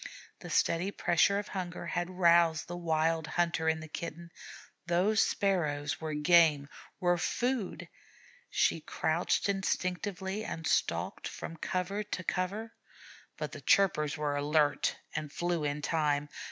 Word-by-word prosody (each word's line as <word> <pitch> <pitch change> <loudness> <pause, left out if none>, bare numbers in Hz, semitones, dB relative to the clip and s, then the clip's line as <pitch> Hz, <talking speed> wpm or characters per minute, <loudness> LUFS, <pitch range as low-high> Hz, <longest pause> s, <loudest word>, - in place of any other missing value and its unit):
The - - -9
steady 175 +4 +1
pressure 200 0 +2
of 205 0 -4
hunger 180 -3 -5
had 175 +1 -2
roused 170 -3 +4
the 175 - -5
wild 160 -1 0
hunter 170 -2 +1
in 160 0 0
the 160 - -8
Kitten; 170 +2 -7 0.6
those 190 +6 +3
Sparrows 150 -8 0
were 155 -1 -3
game 150 -2 +4 0.3
were 175 -1 +2
food. 245 +1 -1 0.6
She - - +1
crouched - - 0
instinctively 190 +1 -2
and 165 -6 -5
stalked - - 0
from 165 - -7
cover 185 +5 -2
to 205 -3 -5
cover, 205 +6 -2 0.6
but - - -4
the - - -9
chirpers 160 -6 +3
were 150 -1 -1
alert 145 0 +1 0.2
and 150 -1 -3
flew 175 0 -1
in 145 0 -2
time. 150 -2 0
170 Hz, 135 wpm, -31 LUFS, 155-185 Hz, 0.6 s, roused